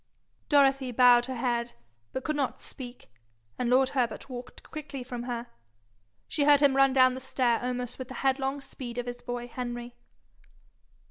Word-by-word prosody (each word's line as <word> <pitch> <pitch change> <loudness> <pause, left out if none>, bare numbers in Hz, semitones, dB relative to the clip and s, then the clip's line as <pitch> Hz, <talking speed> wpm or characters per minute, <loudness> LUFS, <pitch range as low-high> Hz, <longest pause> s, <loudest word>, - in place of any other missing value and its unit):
Dorothy 275 -3 +4
bowed 245 0 +6
her 260 - -4
head, 240 -1 -1 0.4
but 260 - -4
could 305 - -1
not 275 -3 -1
speak, 245 - -10 0.5
and 245 - 0
lord 260 +1 +4
Herbert 255 +1 -2
walked 245 0 -8
quickly 295 -4 -7
from 245 -1 -6
her. 240 -1 -3 0.8
She 290 - 0
heard 290 -1 +7
him 280 -2 +4
run 275 0 +5
down 255 -1 +5
the 260 - -5
stair 250 -3 +1
almost 250 0 -3
with 260 - -5
the 260 - -9
headlong 270 +1 +1
speed 245 -3 -8
of 245 - -2
his 245 0 -6
boy 245 0 -4
Henry. 240 -1 -5
255 Hz, 165 wpm, -28 LUFS, 245-270 Hz, 0.8 s, heard